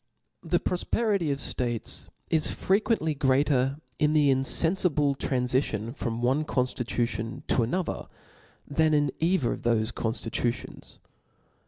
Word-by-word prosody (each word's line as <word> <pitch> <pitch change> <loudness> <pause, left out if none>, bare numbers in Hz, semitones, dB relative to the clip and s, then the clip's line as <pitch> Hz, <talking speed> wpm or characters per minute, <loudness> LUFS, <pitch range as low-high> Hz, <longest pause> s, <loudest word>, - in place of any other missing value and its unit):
The - - +1
profperity 195 -1 0
of 140 - 0
ftatcs 120 -4 -3 0.2
is 160 -2 +3
frequently 195 -5 +1
greater 135 -1 +2 0.2
in 150 0 +3
the 150 -2 +4
infenfible 145 +2 +2
tranlicion 125 -3 -1
from 120 -2 -3
one 135 +5 +2
conflitucion 120 -4 -2
to - - +3
another, 170 +11 -2 0.6
than 155 +1 +2
in 145 -2 +2
either 165 -6 +2
of - - -7
thofe 115 -1 +1
conftitutions. 115 +1 -3
140 Hz, 115 wpm, -27 LUFS, 120-155 Hz, 0.6 s, the